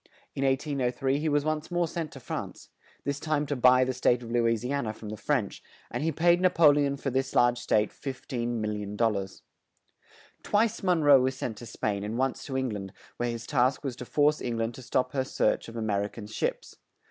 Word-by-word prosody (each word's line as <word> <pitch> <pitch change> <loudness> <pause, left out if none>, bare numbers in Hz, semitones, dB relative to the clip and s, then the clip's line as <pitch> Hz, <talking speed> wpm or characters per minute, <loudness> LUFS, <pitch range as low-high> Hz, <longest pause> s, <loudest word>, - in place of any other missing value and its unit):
In 135 - -2
1803 135 -1 0
he 155 +1 0
was 145 0 +1
once 155 0 -2
more 175 -1 +1
sent 160 -1 -4
to 135 - -9
France; - - -6 0.3
this 140 0 -2
time 155 -1 0
to 145 - -2
buy 125 0 +6
the 130 0 -1
State 125 -1 +2
of 115 - -8
Lou 120 -1 +2
is 115 0 0
i - - -2
an 140 -4 -1
a 110 - -2
from 110 -1 -9
the 110 - -4
French, 110 -1 -1 0.3
and - - -3
he 165 - +1
paid 170 +3 +3
Na 185 - +5
po 165 -3 +6
le 145 0 +2
on 140 0 -2
for 135 -1 -3
this 130 +1 -1
large 120 0 +4
State 105 -3 +1
$15,000,000. 110 -6 -3 1.0
Twice 220 +2 +1
Mon 180 -5 +2
roe 140 -3 +7
was 130 +1 0
sent 115 -4 -3
to 120 +1 -9
Spain 100 -2 -2
and 105 +3 -3
once 130 0 -1
to 135 -2 -2
Eng 130 -1 0
land, 100 -3 -6 0.2
where 120 0 -1
his 115 -1 -5
task 130 -1 +1
was 135 -4 -3
to 125 - -7
force 150 +3 +2
Eng 120 -2 -2
land 115 +1 -1
to 130 - -10
stop 125 0 0
her 135 -2 0
search 130 - 0
of 115 - -11
A 115 - -3
mer 100 -2 0
i - - -2
can 105 0 -10
ships. 105 - -3
130 Hz, 230 wpm, -28 LUFS, 115-145 Hz, 1.0 s, roe